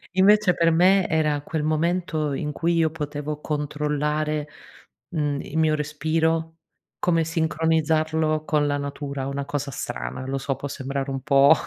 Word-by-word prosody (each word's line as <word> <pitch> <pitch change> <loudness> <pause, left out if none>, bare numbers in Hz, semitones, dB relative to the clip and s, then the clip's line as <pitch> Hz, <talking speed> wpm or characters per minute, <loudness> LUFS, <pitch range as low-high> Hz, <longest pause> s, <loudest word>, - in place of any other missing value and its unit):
Invece 200 0 +5
per 165 0 +3
me 185 +3 +4
era 150 -2 +1
quel 155 0 -3
momento 155 -1 0
in 150 +2 -2
cui 170 +3 0
io 160 -2 +2
potevo 150 -1 -4
controllare, 150 0 -1 0.6
mhmm, 145 -4 -1
il 160 - -6
mio 155 -1 +3
respiro, 160 +2 -1 0.4
come 165 -2 +2
sincronizzarlo 160 -1 +1
con 150 -1 +2
la 145 0 0
natura, 140 -1 -4
una 140 0 -3
cosa 145 -1 -3
strana, - - -5
lo 135 0 -1
so, 135 0 -2
può 145 - -5
sembrare 135 0 -4
un 135 -1 -3
po' 140 +1 +6
150 Hz, 150 wpm, -24 LUFS, 145-160 Hz, 0.6 s, po